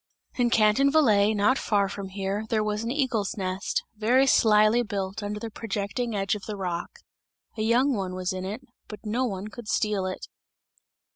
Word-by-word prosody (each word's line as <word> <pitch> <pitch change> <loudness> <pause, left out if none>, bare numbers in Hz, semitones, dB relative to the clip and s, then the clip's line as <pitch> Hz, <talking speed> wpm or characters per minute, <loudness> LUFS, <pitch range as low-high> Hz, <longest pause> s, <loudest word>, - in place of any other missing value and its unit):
In 245 -1 +1
Canton 225 +5 +4
Valais, 215 -9 +4
not 210 +6 +3
far 200 -2 +1
from 195 0 -6
here, 195 +2 -3
there 215 -2 +1
was 210 +1 -2
an 230 - -3
eagle's 240 -7 -1
nest, 190 +1 -2
very 240 +5 +3
slyly 215 -2 +4
built 200 -1 -4
under 205 0 -4
the 225 +1 -6
projecting 220 +2 -3
edge 195 -2 0
of 210 -1 -5
the 210 -2 -4
rock; 175 -3 -3 0.7
a 220 - -4
young 245 +5 +3
one 190 -3 -3
was 185 0 -2
in 185 0 -4
it, 205 +6 -5 0.3
but 210 +1 -10
no 235 +5 0
one 200 -2 -4
could 230 +1 -10
steal 210 -4 0
it! 185 - -5
210 Hz, 185 wpm, -26 LUFS, 195-230 Hz, 0.7 s, Canton